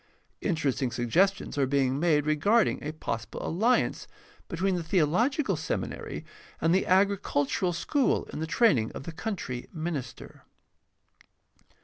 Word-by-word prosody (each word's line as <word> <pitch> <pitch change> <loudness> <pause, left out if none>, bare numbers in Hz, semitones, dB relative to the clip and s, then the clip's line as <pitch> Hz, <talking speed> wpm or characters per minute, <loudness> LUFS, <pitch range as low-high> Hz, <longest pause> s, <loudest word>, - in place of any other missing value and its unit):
Interesting 145 -7 0
suggestions 145 - +1
are 135 - +3
being 135 0 +1
made 155 -3 +2
regarding 200 +10 +2
a 150 - -3
possible 115 -7 -5
alliance 225 +9 +1 0.4
between 185 +3 0
the 175 - -1
theological 190 - +1
seminary - - -4 0.3
and 165 +1 +2
the 190 - +2
agricultural 185 -3 +2
school 255 - +1
in - - -4
the 160 - -2
training 145 - +3
of - - -7
the 165 - -6
country 165 - -5
minister. 155 -7 -6
165 Hz, 120 wpm, -28 LUFS, 140-195 Hz, 0.4 s, are